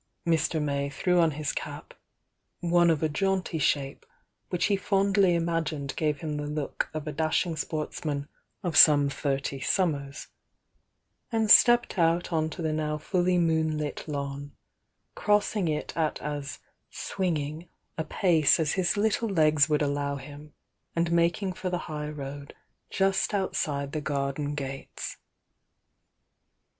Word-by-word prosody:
Mr. 160 -1 +1
May 140 -1 -1
threw 180 +6 +1
on 165 -1 +5
his 150 -1 -3
cap, - - -7 0.4
— - - -52 0.2
one 175 0 +3
of 160 -2 +1
a - - +4
jaunty 185 +1 -1
shape, 140 -1 0 0.5
which 175 -2 0
he 200 - +2
fondly 195 -2 +2
imagined 165 -4 -2
gave 150 -2 -1
him 155 -2 -3
the 145 0 -4
look 150 -1 -3
of 155 -1 -5
a 150 - -3
dashing 160 +3 0
sportsman 150 -1 -3 0.4
of 175 -4 -2
some 145 -2 +7
thirty 140 -1 -2
summers 140 -4 -1 0.5
— - - -49
and 220 -2 +2
stepped 240 -4 +6
out 170 +1 +2
on 160 -1 +1
to 170 +1 -6
the 155 -1 0
now 150 0 -1
fully 180 +3 +1
moonlit 160 -3 0
lawn, 140 -1 -5 0.6
cros'sing 210 -2 +1
it 150 -1 -3
at 160 -2 0
as 145 -2 -5 0.3
"swinging" 160 -3 -3 0.3
a 160 - -2
pace 165 -3 +3
as 155 -2 +1
his 185 0 0
little 220 +2 +1
legs 155 -5 +3
would 150 0 +2
allow 140 0 -1
him, 145 +2 -11 0.4
and 170 0 +1
making 170 +3 +1
for 185 0 -4
the 180 - -1
high 150 -2 -4
road 140 -1 -7 0.3
just 195 +2 +1
outside 145 -7 -1
the 155 - -3
garden 145 0 -2
gates. 135 -1 -6
155 Hz, 145 wpm, -27 LUFS, 145-175 Hz, 0.6 s, some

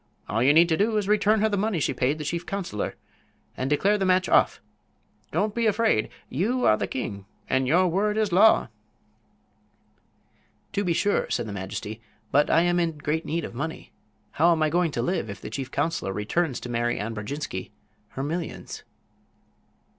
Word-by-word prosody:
"All 110 +2 -1
you 130 +3 +5
need 165 +3 +6
do 205 +7 +1
is 210 - 0
to 205 - 0
return 210 0 +3
her 220 - +3
the 205 - 0
money 205 -3 0
she - - 0
paid 140 +4 0
the 155 - -5
chief 170 +4 -3
counselor 185 - -3 0.6
and 130 +1 -2
declare 200 +8 +2
the - - 0
match 185 0 +3
off. - - +3 0.7
Don't 205 +6 0
be 235 0 +1
afraid. 210 - +2 0.2
You 225 - 0
are 110 - +6
the - - -2
king, 100 -6 -5 0.2
and 130 0 +1
your 180 +6 +4
word 205 +5 0
is 215 -3 +1
law." 195 - +5 2.0
"To 200 0 0
be 175 -3 +1
sure," 205 +5 +1
said - - -1
the 105 - -6
majesty. 100 +3 -6 0.3
"But 145 +2 +3
I 165 - +5
am 175 0 +2
in 165 -3 -1
great 150 +2 -2
need 165 +1 -1
of - - -8
money. 155 +6 -5 0.4
How 170 +3 +4
am 160 -2 +2
I 155 - +1
going 175 0 +2
to 120 - -1
live 175 - -1
if 100 -1 -7
the - - -8
chief 135 -2 -4
counselor 145 -7 -1
returns 130 - -1
to 125 - -7
Mary 120 0 0
Ann 110 +3 -3
Brodjinski 105 -2 -5 0.4
her 135 - -4
millions?" 165 +3 -5
165 Hz, 190 wpm, -25 LUFS, 130-195 Hz, 2.0 s, need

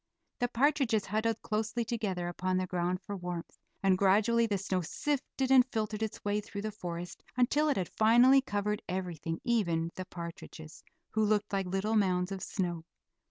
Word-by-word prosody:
The 245 - +2
partridges 250 -4 +2
huddled 220 +2 -1
closely 220 +2 -1
together 205 -7 -2
upon 185 +1 -1
the 185 - 0
ground 180 0 -1
for 205 - -5
warmth, 175 -2 -6 0.2
and 190 -1 +3
gradually 220 +4 +4
the 205 -2 0
snow 190 -1 -1
sifted 270 - -2
and 260 -1 +8
filtered 215 -1 -2
its 220 -1 -4
way 205 +1 +1
through 205 -1 -7
the 215 - -2
forest 175 -4 -6 0.2
until 290 +5 +3
it 285 - +1
had 185 -3 -1
finally 240 +5 +6
covered 210 -3 -2
everything, 175 -3 -3
even 170 -9 +1
the 185 - -6
partridges, 170 -2 -9 0.3
who 220 - +1
looked 210 -1 +1
like 195 -1 0
little 195 +4 -1
mounds 185 -3 +2
of 195 -1 -4
snow. 175 -4 -2
205 Hz, 170 wpm, -31 LUFS, 180-225 Hz, 0.3 s, and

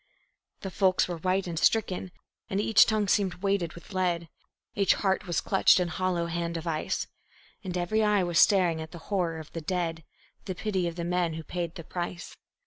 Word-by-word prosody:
The 190 - -5
folks 185 +1 +2
were 175 -1 -4
white 185 +3 0
and 170 -3 -3
stricken, 190 -4 +1 0.4
and 195 - -1
each 215 +1 +5
tongue 215 -2 +1
seemed 185 -2 0
weighted 195 -5 0
with 170 +3 -13
lead; 175 -3 0 0.4
Each 200 -1 +3
heart 190 -1 0
was 170 -3 0
clutched 195 -1 +4
in 180 -1 0
hollow 180 0 -1
hand 170 0 -3
of 165 - -7
ice; 160 -2 -1 0.6
And 180 -2 -3
every 180 +5 +1
eye 210 -2 +3
was 175 -2 +1
staring 175 -5 +4
at 160 0 -8
the - - -7 0.2
horror 175 -4 0
of 155 -1 -9
the 165 - -5
dead, 165 -1 -2 0.4
The 185 - -4
pity 190 -3 -1
of 170 - -4
the 170 -1 -4
men 175 -2 0
who 160 - -6
paid 170 0 -4
the 170 - -7
price. 175 +1 -5
180 Hz, 200 wpm, -28 LUFS, 170-190 Hz, 0.6 s, each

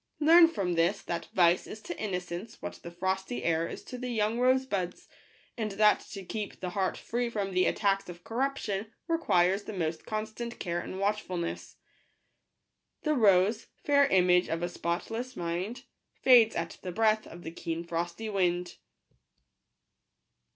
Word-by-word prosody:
Learn 330 +2 +8
from 195 - -2
this 170 +4 +1
that 170 -1 -4
vice 175 -1 +4
is 215 - -8
to - - -7
innocence 180 +1 -4
what - - -7
the 170 - -7
frosty 190 +6 -2
air 165 0 +1
is - - -8
to 250 - -8
the 250 0 -4
young 220 0 0
rose 260 +1 +3
buds; 185 -7 -3 0.5
and 215 -4 -3
that 210 +1 +5
to 195 - -6
keep 210 +2 -5
the 180 -1 -4
heart 190 0 -1
free 240 +1 -2
from 205 -4 -2
the 185 0 +3
attacks 195 -2 +1
of 175 0 -10
corruption 225 -4 -2 0.2
requires 200 - +2
the - - -6
most 165 -4 -3
constant 220 +2 -4
care 175 -1 -2
and 185 +2 -6
watch 205 +2 +1
fulness." 175 -2 -5 1.3
The 305 - +2
rose— 210 -2 +4 0.2
fair 280 -1 +4
image 180 -4 +4
of 165 +1 -2
a 175 - -1
spotless 225 +10 -3
mind 180 +9 -3 0.2
— - - -53
Fades 240 -4 +7
at 165 0 -4
the 185 - -5
breath 215 +2 +2
of 175 +1 -11
the 160 - -6
keen 165 0 -4
frosty 170 +5 -3
wind. 180 -3 0
195 Hz, 165 wpm, -29 LUFS, 175-225 Hz, 1.3 s, Learn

